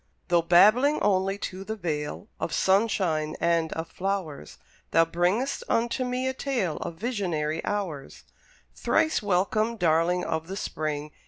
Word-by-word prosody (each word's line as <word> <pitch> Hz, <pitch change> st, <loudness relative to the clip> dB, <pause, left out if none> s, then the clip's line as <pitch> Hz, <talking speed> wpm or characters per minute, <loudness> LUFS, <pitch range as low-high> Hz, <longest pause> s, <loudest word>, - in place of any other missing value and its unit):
Though 175 Hz, -1 st, +4 dB
babbling 215 Hz, -, +5 dB
only 195 Hz, -1 st, +1 dB
to 190 Hz, -1 st, -6 dB
the 220 Hz, +2 st, -4 dB
Vale, 160 Hz, -1 st, -4 dB
Of -, -, -3 dB
sunshine 190 Hz, -6 st, +1 dB
and 170 Hz, -1 st, +1 dB
of 160 Hz, 0 st, -4 dB
flowers, 185 Hz, -, -4 dB, 0.3 s
Thou 165 Hz, -, +4 dB
bringest 180 Hz, +11 st, 0 dB
unto 240 Hz, +3 st, +1 dB
me 250 Hz, +1 st, -2 dB
a 260 Hz, -, 0 dB
tale 240 Hz, -, -2 dB
Of 170 Hz, -, -5 dB
visionary 170 Hz, -8 st, -2 dB
hours. 180 Hz, -10 st, -4 dB, 0.5 s
Thrice 315 Hz, -, +1 dB
welcome, 215 Hz, +4 st, +1 dB
darling 175 Hz, 0 st, +2 dB
of 160 Hz, 0 st, -2 dB
the 195 Hz, +2 st, -5 dB
Spring! 150 Hz, -4 st, -3 dB
185 Hz, 140 wpm, -26 LUFS, 160-215 Hz, 0.5 s, babbling